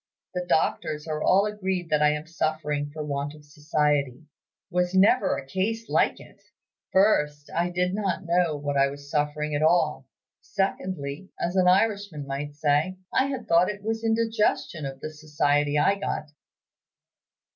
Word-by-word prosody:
The 180 Hz, -1 st, -2 dB
doctors 150 Hz, -1 st, 0 dB
are 155 Hz, -1 st, -3 dB
all 195 Hz, +5 st, +4 dB
agreed 190 Hz, -5 st, -3 dB
that 150 Hz, -1 st, +3 dB
I 150 Hz, -, +5 dB
am 150 Hz, +1 st, -2 dB
suffering 155 Hz, -3 st, -2 dB
for 155 Hz, 0 st, -5 dB
want 145 Hz, 0 st, -3 dB
of 150 Hz, -1 st, -16 dB
society. 150 Hz, -2 st, 0 dB, 0.5 s
Was 180 Hz, +1 st, 0 dB
never 205 Hz, +7 st, +4 dB
a 135 Hz, -, -7 dB
case 220 Hz, +9 st, -2 dB
like -, -, +2 dB
it! -, -, -16 dB, 0.5 s
First, 150 Hz, -7 st, +2 dB
I 170 Hz, +2 st, +1 dB
did 180 Hz, +1 st, 0 dB
not 195 Hz, -3 st, -2 dB
know 170 Hz, -3 st, +1 dB
that 145 Hz, -1 st, 0 dB
I 135 Hz, -, +5 dB
was 140 Hz, 0 st, -9 dB
suffering 150 Hz, 0 st, -1 dB
at 145 Hz, -, 0 dB
all. 155 Hz, -4 st, +2 dB, 0.3 s
Secondly, 185 Hz, -4 st, -3 dB
as 175 Hz, +2 st, -2 dB
an 185 Hz, -1 st, +4 dB
Irishman 195 Hz, -5 st, +2 dB
might 140 Hz, +1 st, -5 dB
say, 150 Hz, +5 st, +1 dB, 0.2 s
I 265 Hz, -, +3 dB
had 265 Hz, -3 st, -5 dB
thought 170 Hz, +2 st, +4 dB
it 205 Hz, -1 st, -6 dB
was 225 Hz, +1 st, -2 dB
indigestion 225 Hz, -9 st, 0 dB
of 135 Hz, 0 st, -8 dB
the 155 Hz, -, -5 dB
society 150 Hz, -1 st, 0 dB
I 195 Hz, +6 st, +3 dB
got." 155 Hz, -6 st, -3 dB
155 Hz, 160 wpm, -26 LUFS, 145-190 Hz, 0.5 s, I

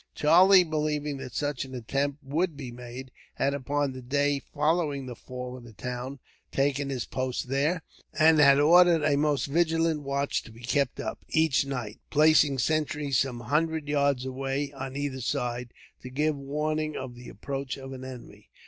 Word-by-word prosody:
Charlie, 180 Hz, +5 st, +6 dB
believing 150 Hz, -3 st, -2 dB
that 130 Hz, -, -8 dB
such 145 Hz, -3 st, -1 dB
an 130 Hz, -1 st, -9 dB
attempt 140 Hz, +4 st, -2 dB
would 155 Hz, +3 st, -1 dB
be 130 Hz, -4 st, -6 dB
made, 125 Hz, +2 st, -9 dB, 0.2 s
had 140 Hz, -, +1 dB
upon 140 Hz, 0 st, -1 dB
the 130 Hz, -, -8 dB
day 140 Hz, +3 st, +1 dB
following 150 Hz, -2 st, -1 dB
the 125 Hz, -1 st, -7 dB
fall 125 Hz, +1 st, -7 dB
of 125 Hz, -, -11 dB
the 115 Hz, -1 st, -13 dB
town 125 Hz, +5 st, -5 dB, 0.3 s
taken 140 Hz, 0 st, 0 dB
his 130 Hz, -3 st, -3 dB
post 130 Hz, -1 st, -3 dB
there, 150 Hz, +6 st, 0 dB, 0.3 s
and 160 Hz, 0 st, +6 dB
had 140 Hz, -1 st, +7 dB
ordered 170 Hz, +1 st, +6 dB
a 145 Hz, -1 st, +3 dB
most 145 Hz, -1 st, +1 dB
vigilant 165 Hz, 0 st, +1 dB
watch 140 Hz, 0 st, -1 dB
to -, -, -14 dB
be 115 Hz, +2 st, -14 dB
kept 140 Hz, +1 st, 0 dB
up, 110 Hz, -, -4 dB
each 160 Hz, -4 st, +2 dB
night; 120 Hz, -6 st, -5 dB
placing 150 Hz, -2 st, +4 dB
sentries 150 Hz, -1 st, 0 dB
some 125 Hz, -2 st, -1 dB
hundred 155 Hz, +4 st, 0 dB
yards 140 Hz, -3 st, +1 dB
away, 135 Hz, +2 st, -2 dB
on 135 Hz, -1 st, -7 dB
either 140 Hz, -2 st, -3 dB
side, 120 Hz, 0 st, -2 dB, 0.3 s
to 125 Hz, -, -8 dB
give 150 Hz, +4 st, 0 dB
warning 150 Hz, +2 st, -2 dB
of 130 Hz, -2 st, -6 dB
the 120 Hz, 0 st, -11 dB
approach 135 Hz, +5 st, -5 dB
of 135 Hz, 0 st, -8 dB
an 130 Hz, 0 st, -8 dB
enemy. 130 Hz, -2 st, -10 dB
140 Hz, 175 wpm, -27 LUFS, 130-150 Hz, 0.3 s, had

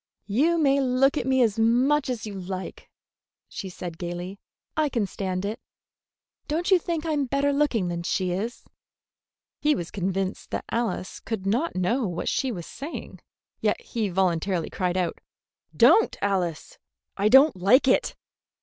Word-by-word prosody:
"You 285 Hz, -, +2 dB
may 280 Hz, -3 st, +3 dB
look 265 Hz, +2 st, +3 dB
at 260 Hz, -, -2 dB
me 260 Hz, -1 st, +4 dB
as 225 Hz, -1 st, 0 dB
much 260 Hz, +6 st, +3 dB
as 245 Hz, -3 st, -3 dB
you 210 Hz, -, -6 dB
like," 185 Hz, 0 st, -6 dB, 0.6 s
she 195 Hz, -, -6 dB
said 175 Hz, -2 st, -7 dB
gayly. 175 Hz, +2 st, -5 dB, 0.4 s
"I 310 Hz, -1 st, +2 dB
can 230 Hz, -6 st, 0 dB
stand 190 Hz, -1 st, -3 dB
it. 215 Hz, +3 st, -4 dB, 0.9 s
Don't 335 Hz, +5 st, -1 dB
you 375 Hz, -, +6 dB
think 335 Hz, -1 st, -3 dB
I 320 Hz, -, -1 dB
am 290 Hz, -2 st, +1 dB
better 280 Hz, +2 st, +1 dB
looking 275 Hz, -10 st, +1 dB
than 170 Hz, 0 st, -3 dB
she 180 Hz, +1 st, -1 dB
is?" 215 Hz, +7 st, -4 dB, 0.9 s
He 300 Hz, 0 st, +3 dB
was 170 Hz, -1 st, -5 dB
convinced 190 Hz, 0 st, -2 dB
that -, -, -4 dB
Alice 230 Hz, -5 st, -2 dB
could 215 Hz, -4 st, -5 dB
not 245 Hz, +12 st, 0 dB
know 220 Hz, +7 st, +1 dB
what 175 Hz, -2 st, -4 dB
she 265 Hz, -2 st, 0 dB
was 175 Hz, -7 st, -6 dB
saying, 295 Hz, +5 st, -8 dB, 0.4 s
yet -, -, +1 dB
he 235 Hz, -, -3 dB
involuntarily 180 Hz, -2 st, 0 dB
cried 180 Hz, -1 st, -1 dB
out: 180 Hz, -3 st, -1 dB, 0.6 s
"Don't, 450 Hz, -, +5 dB
Alice! 185 Hz, -5 st, -2 dB, 0.4 s
I 205 Hz, +2 st, +2 dB
don't 270 Hz, +2 st, +7 dB
like 205 Hz, +10 st, +4 dB
it!" 260 Hz, -, +2 dB
220 Hz, 160 wpm, -25 LUFS, 185-275 Hz, 0.9 s, don't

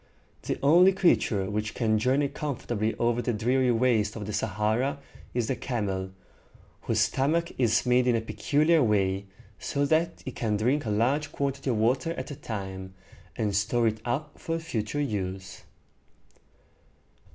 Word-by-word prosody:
The -, -, -3 dB
only 175 Hz, +7 st, +6 dB
creature 115 Hz, -, +2 dB
which 105 Hz, +1 st, -3 dB
can 110 Hz, -3 st, +1 dB
journey 135 Hz, +5 st, +2 dB
comfortably 120 Hz, -7 st, -3 dB
over 120 Hz, 0 st, +1 dB
the 120 Hz, -, -1 dB
dreary 125 Hz, +4 st, +1 dB
waste 115 Hz, -3 st, +2 dB
of 105 Hz, -2 st, -5 dB
the 105 Hz, -, -5 dB
Sa 105 Hz, +1 st, -1 dB
ha´ra 115 Hz, +7 st, 0 dB, 0.4 s
is 120 Hz, -2 st, +1 dB
the 130 Hz, -, -1 dB
camel, 100 Hz, -7 st, -3 dB, 0.7 s
whose -, -, 0 dB
stomach 165 Hz, +6 st, +1 dB
is 120 Hz, -2 st, +2 dB
made 125 Hz, 0 st, +3 dB
in 120 Hz, -, +4 dB
a 115 Hz, -, 0 dB
peculiar 145 Hz, +10 st, +2 dB
way, 100 Hz, -4 st, +1 dB, 0.3 s
so 140 Hz, -1 st, -1 dB
that 160 Hz, +3 st, 0 dB
it 130 Hz, -, -6 dB
can 110 Hz, -3 st, 0 dB
drink 125 Hz, +7 st, +1 dB
a -, -, 0 dB
large 130 Hz, +8 st, +1 dB
quantity 140 Hz, -1 st, -2 dB
of 120 Hz, -, +1 dB
water 130 Hz, +9 st, +1 dB
at 170 Hz, -, -6 dB
a -, -, -5 dB
time, 95 Hz, -5 st, -6 dB, 0.4 s
and 105 Hz, -3 st, -1 dB
store 115 Hz, +4 st, +1 dB
it 110 Hz, -1 st, 0 dB
up 140 Hz, +5 st, -3 dB
for 165 Hz, 0 st, -2 dB
future 145 Hz, -5 st, -3 dB
use. 95 Hz, -8 st, -4 dB
120 Hz, 160 wpm, -27 LUFS, 105-140 Hz, 0.7 s, only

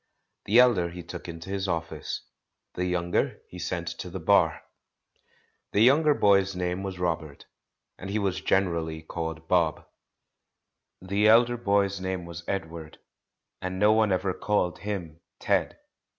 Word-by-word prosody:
The 110 Hz, -, +3 dB
elder 120 Hz, -9 st, +5 dB
he 90 Hz, +1 st, -8 dB
took 85 Hz, -, -8 dB
into 85 Hz, +3 st, -8 dB
his 100 Hz, 0 st, -2 dB
office; 80 Hz, -3 st, -3 dB, 0.5 s
the 90 Hz, -, -2 dB
younger 90 Hz, -1 st, 0 dB
he 90 Hz, -, -10 dB
sent 85 Hz, 0 st, -3 dB
to 90 Hz, -, -5 dB
the 95 Hz, +2 st, -6 dB
Bar. 80 Hz, -, +3 dB, 1.1 s
The 105 Hz, -, +3 dB
younger 145 Hz, +5 st, +5 dB
boy's 100 Hz, -1 st, +3 dB
name 90 Hz, +1 st, -2 dB
was 95 Hz, -1 st, -5 dB
Robert, 80 Hz, -5 st, -3 dB, 0.5 s
and 95 Hz, -, -7 dB
he 100 Hz, -, -1 dB
was 95 Hz, -3 st, -1 dB
generally 85 Hz, -5 st, 0 dB
called 80 Hz, 0 st, -5 dB
"Bob." 85 Hz, -3 st, +1 dB, 1.2 s
The 100 Hz, +3 st, +2 dB
elder 120 Hz, +2 st, +5 dB
boy's 100 Hz, -3 st, +1 dB
name 95 Hz, -2 st, -3 dB
was 85 Hz, 0 st, -8 dB
Ed 95 Hz, -5 st, -2 dB
ward, 80 Hz, -2 st, -10 dB, 0.6 s
and 95 Hz, 0 st, -4 dB
no 105 Hz, +2 st, +5 dB
one 110 Hz, -2 st, +3 dB
ever 95 Hz, 0 st, 0 dB
called 95 Hz, -4 st, -1 dB
him 90 Hz, -6 st, -5 dB, 0.2 s
"Ted." -, -, 0 dB
90 Hz, 150 wpm, -27 LUFS, 85-100 Hz, 1.2 s, elder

